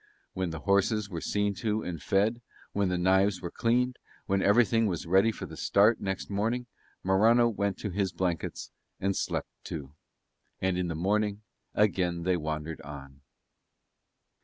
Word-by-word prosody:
When 95 -2 -2
the 80 -2 -6
horses 100 +1 +2
were 85 -2 -4
seen 105 0 0
to 110 -1 0
and 85 -4 -5
fed, 110 +5 +1 0.3
when 100 -2 +1
the 90 - 0
knives 95 +2 +3
were 85 -2 -6
cleaned, 125 +2 +1 0.3
when 100 -1 +1
everything 115 +2 +4
was 90 -4 -2
ready 95 +6 +4
for - - -7
the - - -9
start 105 +4 +3
next 95 -1 -3
morning, 115 +5 -1 0.4
Morano 110 +6 +5
went 100 -3 -1
to 105 - -3
his 95 0 0
blankets 85 -1 -3 0.3
and 95 0 0
slept - - -2
too. 70 -3 -6 0.7
And 95 -1 +1
in 90 0 -1
the 85 - -3
morning 105 +4 0 0.3
again 90 -5 +1
they 90 +1 +2
wandered 80 -1 -4
on. 70 -1 -10
95 Hz, 160 wpm, -29 LUFS, 90-105 Hz, 0.7 s, Morano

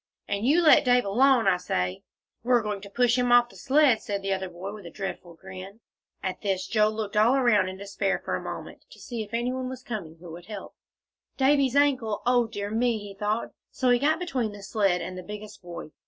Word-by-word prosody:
"And 200 +3 -1
you 330 +5 +4
let 310 - +7
Dave 250 -3 +3
alone, 240 +2 +4
I 180 - +4
say." 90 - -2 0.4
"We're 240 -1 +2
going 210 -2 -3
to 200 - -10
push 245 +3 +2
him 245 -1 +1
off 240 0 +6
th' - - -17
sled," 275 -4 +3
said 200 -1 -4
the 195 0 0
other 190 -1 -3
boy, 180 +3 -7
with 205 -5 -10
a - - -7
dreadful 180 -2 -6
grin. 190 +4 -10 0.4
At 185 -1 -3
this 190 -2 -1
Joel 215 +1 +2
looked 215 -1 -4
all 220 +5 +5
around 235 -8 +3
in 190 - -8
despair 200 0 -1
for - - -3
a - - -4
moment - - -8
to - - -15
see 235 -3 -5
if 210 -1 -8
any 240 +2 -1
one 255 -1 -3
was 255 -1 -8
coming 195 -10 -6
who 170 -1 -11
would 170 +2 -11
help. 210 -3 -8 0.6
"Davie's 275 -1 +3
ankle. 260 -7 +2
O 245 -1 +3
dear 205 -2 -5
me!" 235 +1 +1
he 205 -1 -8
thought. 210 +3 -2 0.2
So 255 -2 +1
he 245 - +4
got 305 +4 +2
between 265 -12 -2
the 205 -1 -11
sled 195 -3 +1
and 180 +2 -6
the 185 - -6
biggest 210 +2 -9
boy. 170 -3 -9
215 Hz, 230 wpm, -26 LUFS, 195-245 Hz, 0.6 s, let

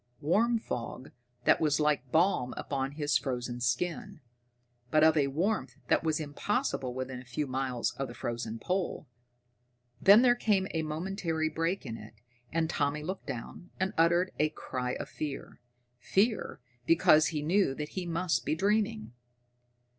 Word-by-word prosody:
Warm 225 +10 +3
fog 125 - -5 0.3
that - - +4
was 150 -1 +2
like 150 -4 +1
balm 160 -7 +2
upon 135 -1 -2
his 145 -2 +1
frozen 125 -2 -4
skin, 125 +6 -2 0.7
but 155 +4 +4
of 160 0 +6
a 145 -3 +3
warmth 185 +10 -1
that - - +3
was 160 -1 +1
impossible 150 - -2
within 130 -1 -4
a - - -12
few 125 +4 -3
miles 130 -2 -1
of 135 - -2
the 120 - -10
frozen 115 -1 -4
pole. 180 +5 -2 1.0
Then 205 +5 +8
there 245 -1 +6
came 205 -5 +1
a 160 - -1
momentary 160 0 -2
break 165 +3 -2
in 115 -3 -5
it, 110 0 -12 0.4
and 165 0 +1
Tommy 150 -2 -1
looked 185 +4 -5
down 135 +6 -7
and 190 +1 0
uttered 170 +3 +3
a 155 +1 +3
cry 125 -4 -4
of - - -5
fear. 145 -5 -6 0.4
Fear, 215 - 0 0.3
because 155 -2 +5
he 150 -2 -2
knew 170 -3 +2
that 150 +1 -5
he 185 -2 -5
must 170 +1 0
be - - 0
dreaming. 210 - 0
155 Hz, 155 wpm, -30 LUFS, 135-185 Hz, 1.0 s, Then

